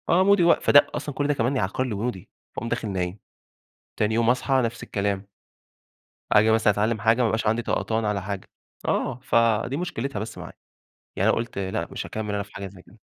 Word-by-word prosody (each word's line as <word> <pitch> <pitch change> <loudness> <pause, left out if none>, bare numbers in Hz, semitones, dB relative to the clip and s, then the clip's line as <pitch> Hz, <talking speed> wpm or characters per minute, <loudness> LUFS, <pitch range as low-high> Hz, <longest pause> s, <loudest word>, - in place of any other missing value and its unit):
آه، 180 +3 +5
مودي 200 -2 +5
وق 170 - +5
فده 145 - +6
أصلًا 145 - -4
كل 145 - 0
ده 145 - +2
كمان 130 +1 0
يعكَّر 125 +1 0
لي 125 -5 -3
مودي، 100 -3 -4 0.3
فاقوم 115 - -4
داخل 110 - -2
نايم. 90 +1 -3 0.8
تاني 110 +1 +1
يوم 115 0 +3
أصحى 130 +1 +2
نفس 115 0 -3
الكلام. 100 -1 -2 1.0
آجي 110 +1 +5
مثلًا 110 -2 +4
أتعلّم 110 +2 0
حاجة 115 +2 +3
ما - - +3
يبقاش 110 0 0
عندي 110 +2 +2
طقطان 110 -1 -1
على 105 -2 0
حاجة. 100 0 -5 0.4
آه، 125 - 0
فدي 115 +1 +2
مشكلتها 140 -9 -3
بس 110 +2 -6
معايا. - - -8 0.6
يعني - - +2
أنا - - +2
قُلت 115 -2 -4
لأ 95 -3 -2
مش - - -5
هاكمّل 105 -1 -4
أنا 100 - -1
في 100 - -16
حاجة 100 - -5
زي 95 -1 -12
كده. 110 - -20
110 Hz, 205 wpm, -25 LUFS, 100-125 Hz, 1.0 s, فده